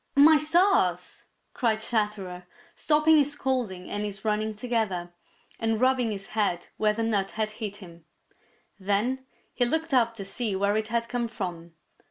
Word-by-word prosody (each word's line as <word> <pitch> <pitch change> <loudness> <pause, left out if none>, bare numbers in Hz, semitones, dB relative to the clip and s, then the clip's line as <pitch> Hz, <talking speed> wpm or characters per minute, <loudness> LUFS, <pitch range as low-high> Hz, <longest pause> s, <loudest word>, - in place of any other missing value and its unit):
"My 300 +3 +8
stars!" 345 +7 +1 0.3
cried 225 -4 +1
Chatterer, 210 -5 -2 0.3
stopping 310 0 +4
his 290 0 +2
scolding 245 -11 -2
and 205 - -3
his 200 0 -6
running 215 0 0
together, 205 -7 -2 0.5
and 225 -1 0
rubbing 255 -2 +2
his 200 -2 -5
head 205 -5 -1
where 215 -1 +2
the 225 +1 -2
nut 205 -4 0
had 215 -1 -2
hit 215 -2 -6
him. 170 -5 -13 0.7
Then 225 +7 -1 0.3
he 250 - +1
looked 320 +5 -1
up 230 -3 +3
to 200 -3 -6
see 215 0 -2
where 200 +2 +1
it 215 0 -1
had 230 +1 -1
come 240 -1 -2
from. 175 -6 -6
220 Hz, 160 wpm, -27 LUFS, 200-250 Hz, 0.7 s, My